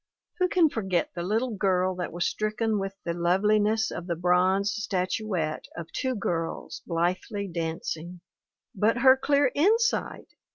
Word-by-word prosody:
Who 365 - +3
can 355 -3 +4
forget 190 - -1
the 175 - -4
little 220 +6 -1
girl 185 -2 +1
that 180 - -3
was 175 +1 -2
stricken 215 0 -1
with 195 0 -4
the 170 - -1
loveliness 210 +5 +2
of 175 +1 -6
the 170 - -1
bronze 185 +4 +2
statuette 185 -5 -2
of 170 -1 -7
two 260 -1 -2
girls 165 -5 -3
blithely 185 +4 -1
dancing? 165 0 -4 0.5
But 215 +4 +2
her 260 +2 +7
clear 280 0 +2
insight! 435 +9 +1
195 Hz, 140 wpm, -27 LUFS, 175-220 Hz, 0.5 s, her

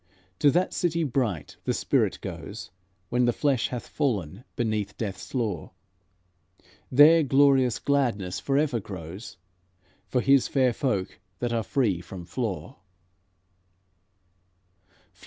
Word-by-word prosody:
To 145 - +5
that 175 +5 +1
city 170 -2 0
bright 120 - -2
the - - 0
spirit - - +1
goes - - -7 0.4
When 125 0 +2
the 120 - +3
flesh 135 -1 +1
hath 125 -2 -6
fallen 105 - -2
beneath 110 -3 -2
death's 100 +2 -5
law; 105 -10 -2 1.2
There 150 +5 +7
glorious 135 -3 +4
gladness 120 -10 0
forever 140 -3 +1
grows 95 +1 -8 0.7
For 125 - 0
His 135 0 +4
fair 130 -3 +2
folk 105 -9 -2 0.2
that 120 +2 -2
are 115 - +1
free 110 - 0
from 90 0 -9
flaw." 95 -6 -4
120 Hz, 115 wpm, -26 LUFS, 100-140 Hz, 1.2 s, There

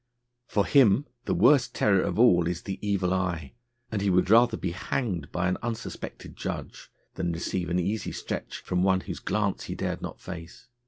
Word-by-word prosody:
For 100 -2 +1
him 130 0 +5 0.2
the - - 0
worst 140 -5 +4
terror 100 -3 +3
of - - -2
all 90 -8 +5
is 90 0 -3
the 95 -2 -5
evil 100 -3 0
eye, 85 -6 -2 0.4
and 105 -3 -1
he 100 - +2
would 90 +1 +3
rather 115 0 +6
be 90 - -2
hanged 90 - -3
by 90 0 0
an 90 - -1
unsuspected 115 -1 -6
judge - - -6 0.2
than 85 - -2
receive 85 +1 -2
an 90 - +1
easy 100 +5 -1
stretch - - -5
from 90 0 -1
one 95 0 +3
whose - - -6
glance 105 -2 -1
he - - -5
dared - - -3
not - - -6
face. 85 -2 -9
95 Hz, 190 wpm, -27 LUFS, 90-105 Hz, 0.4 s, rather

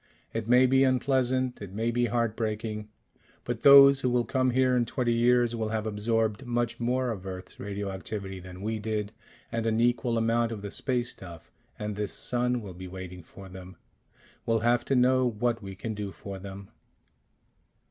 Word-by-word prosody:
It 115 -1 -3
may 125 +2 +6
be 135 +1 +4
unpleasant. 130 -1 +1
It 100 -2 -8
may 115 +3 -1
be 120 +1 +1
heart 115 -1 0
breaking. 110 -1 -3 0.5
But 120 -2 -4
those 140 -1 +9
who 125 - 0
will 120 -1 +1
come 130 -1 +1
here 130 0 +3
in 120 -1 +2
twenty 120 0 0
years 120 0 +3
will 110 -1 -2
have 110 0 -2
absorbed 110 +2 0
much 120 -2 -2
more 125 +1 0
of 95 -4 -6
Earth's 95 -1 -8
radioactivity 100 -1 -5
than 90 +1 -10
we 110 +1 -2
did, 105 -1 -3 0.4
and 115 0 -1
an 110 0 +1
equal 120 0 +1
amount 115 +1 +1
of 105 -3 -6
the 100 - -5
space 125 -3 -1
stuff, 85 -4 -11 0.3
and 105 -1 -4
this 105 -1 -3
sun 125 -1 -1
will 95 -3 -8
be 90 +1 -9
waiting 90 -1 -8
for 95 +4 -13
them.... 95 0 -11 0.7
We'll 115 -1 +1
have 120 +1 +2
to 135 - +1
know 130 0 +4
what 115 +1 -1
we 95 -1 -8
can 110 +4 -5
do 105 -1 -5
for 100 0 -8
them." 95 0 -9
115 Hz, 185 wpm, -28 LUFS, 100-120 Hz, 0.7 s, those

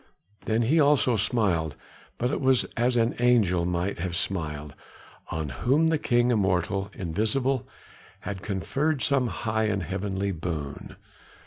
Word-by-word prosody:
Then 110 +1 +1
he 150 +8 +3
also 140 -4 +4
smiled, 95 - +1 0.4
but 125 +2 0
it - - -2
was 130 -2 +4
as 120 +1 +2
an 115 0 +2
angel 105 -8 +3
might 90 +2 -1
have 85 0 -3
smiled, 75 -6 -3 0.6
on 80 -2 -3
whom 135 - +2
the 160 -2 +1
King 120 -2 +2
immortal, 95 -2 +1
invisible, 110 +9 -1 0.5
had 100 -2 -5
conferred 135 +10 -1
some 135 -3 +2
high 110 -1 -1
and 100 -3 0
heavenly 95 +3 -2
boon. 80 -5 -5
105 Hz, 135 wpm, -26 LUFS, 90-125 Hz, 0.6 s, also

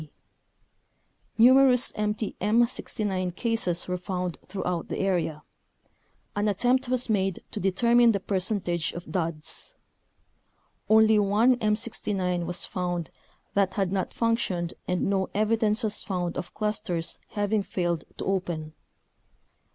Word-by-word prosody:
d. 155 - -11 1.3
Numerous 255 +1 +6
empty 210 0 -2
M69 205 -4 0
cases 205 -7 -1
were 180 0 -2
found 180 -2 -3
throughout 180 -3 -3
the - - -4
area. 170 -6 -1 0.9
An 205 +1 +1
attempt 245 +6 +2
was 255 -1 +1
made 195 -4 0
to - - -4
determine 235 +5 +4
the 200 - 0
percentage 185 -3 -1
of 175 - -8
duds. 165 - -4 1.1
Only 220 0 +6
one 210 +5 +4
M69 205 -5 -1
was 175 - -2
found 175 -2 -3 0.4
that 200 -1 +1
had 195 -3 0
not 195 -1 -1
functioned 195 -7 0
and 180 -1 0
no 190 -1 0
evidence 215 0 +2
was 210 -1 -2
found 180 -3 -3
of 180 -1 -6
clusters 195 -6 -2
having 205 0 0
failed 175 -4 -2
to - - -4
open. 170 -5 -2
195 Hz, 120 wpm, -27 LUFS, 180-220 Hz, 1.3 s, Numerous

